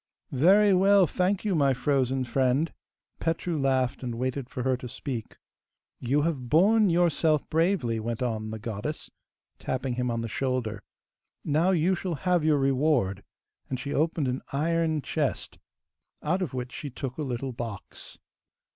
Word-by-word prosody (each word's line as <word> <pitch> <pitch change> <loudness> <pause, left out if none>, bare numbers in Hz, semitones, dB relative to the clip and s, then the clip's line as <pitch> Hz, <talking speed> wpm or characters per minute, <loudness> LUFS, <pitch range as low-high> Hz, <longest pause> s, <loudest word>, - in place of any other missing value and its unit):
'Very 195 +9 +5
well, 195 +1 +5
thank 185 +4 0
you, 205 - +1
my 140 -5 +3
frozen 130 0 +1
friend!' 130 +5 +1 0.5
Petru 165 +1 -1
laughed, 130 -2 +1
and 120 -2 -4
waited 130 +1 -3
for 125 - -4
her 130 0 +2
to 125 - -7
speak. 125 -2 -6 0.6
'You 140 +4 +1
have 140 -7 -2
borne 205 - +5
yourself 165 -3 +2
bravely,' 160 - +1
went 115 +2 -3
on 110 -3 -2
the 110 - -5
goddess, 110 +7 -5 0.5
tapping 130 0 -2
him 125 0 -1
on 115 -1 -1
the 115 - -3
shoulder. 120 -4 -2 0.6
'Now 155 +5 +2
you 180 0 +3
shall 180 -1 -2
have 180 0 +1
your 155 -1 +3
reward,' 135 -8 +1 0.5
and 130 - -3
she 140 - -4
opened 155 -1 +1
an 125 +1 -2
iron 160 +1 0
chest, 150 -4 -2 0.6
out 180 +5 0
of 175 -9 -2
which 125 0 -4
she 145 - -6
took 130 +1 -6
a - - 0
little 130 -1 -3
box. 115 -4 -8
135 Hz, 155 wpm, -27 LUFS, 125-165 Hz, 0.6 s, Very